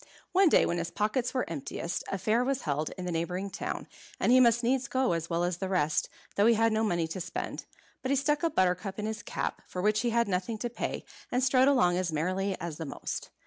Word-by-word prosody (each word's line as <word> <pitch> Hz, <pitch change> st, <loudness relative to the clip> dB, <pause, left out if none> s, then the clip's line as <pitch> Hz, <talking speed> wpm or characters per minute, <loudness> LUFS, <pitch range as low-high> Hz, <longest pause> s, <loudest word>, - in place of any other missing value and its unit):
One 375 Hz, -1 st, +5 dB
day, -, -, +5 dB
when 175 Hz, -, 0 dB
his 170 Hz, 0 st, -2 dB
pockets 235 Hz, +4 st, 0 dB
were 255 Hz, -, -1 dB
emptiest, 165 Hz, +2 st, -4 dB
a 195 Hz, -, -2 dB
fair 220 Hz, +5 st, +2 dB
was 270 Hz, 0 st, -1 dB
held 150 Hz, 0 st, -1 dB
in 185 Hz, -, -5 dB
the 180 Hz, -, -2 dB
neighbouring 180 Hz, +4 st, -2 dB
town, -, -, -4 dB, 0.3 s
and -, -, +3 dB
he 255 Hz, -, +7 dB
must 240 Hz, -1 st, +5 dB
needs 260 Hz, +2 st, +1 dB
go 260 Hz, -8 st, +1 dB
as 165 Hz, 0 st, -3 dB
well 170 Hz, 0 st, 0 dB
as 175 Hz, -1 st, 0 dB
the 190 Hz, +1 st, -3 dB
rest, 155 Hz, -5 st, +1 dB, 0.3 s
though 205 Hz, +2 st, +4 dB
he 235 Hz, -, +6 dB
had 225 Hz, 0 st, +3 dB
no 220 Hz, +1 st, +1 dB
money 175 Hz, -6 st, +1 dB
to 170 Hz, +3 st, -5 dB
spend. 180 Hz, -, -5 dB, 0.4 s
But 260 Hz, -, -3 dB
he 275 Hz, -, +3 dB
stuck 290 Hz, +2 st, +1 dB
a 335 Hz, -, +2 dB
buttercup 185 Hz, -, 0 dB
in 210 Hz, -, -3 dB
his 220 Hz, 0 st, -3 dB
cap, -, -, -3 dB
for 180 Hz, -, -6 dB
which 210 Hz, +3 st, +2 dB
he 240 Hz, -, +1 dB
had 235 Hz, 0 st, +2 dB
nothing 195 Hz, +4 st, -1 dB
to 240 Hz, +2 st, -3 dB
pay, -, -, -4 dB, 0.3 s
and 250 Hz, +1 st, +1 dB
strode 255 Hz, 0 st, +5 dB
along 180 Hz, -11 st, +4 dB
as 180 Hz, -2 st, -1 dB
merrily 185 Hz, +5 st, -1 dB
as 165 Hz, -3 st, -5 dB
the 160 Hz, -, -5 dB
most. -, -, -5 dB
200 Hz, 245 wpm, -29 LUFS, 175-245 Hz, 0.4 s, he